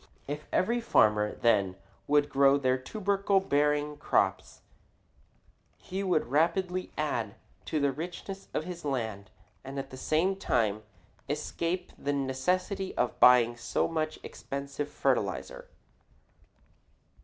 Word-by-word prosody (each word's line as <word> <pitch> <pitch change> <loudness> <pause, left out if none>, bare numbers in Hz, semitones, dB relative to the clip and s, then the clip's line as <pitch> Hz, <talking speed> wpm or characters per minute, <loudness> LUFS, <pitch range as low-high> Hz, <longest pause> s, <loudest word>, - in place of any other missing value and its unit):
If 150 +2 -5
every 235 +5 +1
farmer, 105 - +3
then, 100 -5 +2 0.3
would 145 0 +4
grow 140 0 +4
these 130 -2 +1
tubercle 200 +2 +1
bearing 150 -3 +1
crops, 145 - 0 1.2
he 190 +2 -5
would 180 -5 +1
rapidly 180 +4 +1
add 120 -9 -2 0.3
to 155 - -1
the 140 -1 +2
richness 175 +6 -7
of - - -2
his 175 0 -7
land 110 -8 -3 0.3
and 135 +1 -7
at 135 - -5
the 130 - -8
same 170 +8 +1
time 110 - 0 0.5
escape 175 +2 -2
the 145 - -1
necessity 180 +9 -1
of 125 - 0
buying 120 -1 +6
so 120 0 0
much 155 -1 -2
expensive 140 +1 -5
fertilizer. - - -1
145 Hz, 120 wpm, -29 LUFS, 130-180 Hz, 1.2 s, buying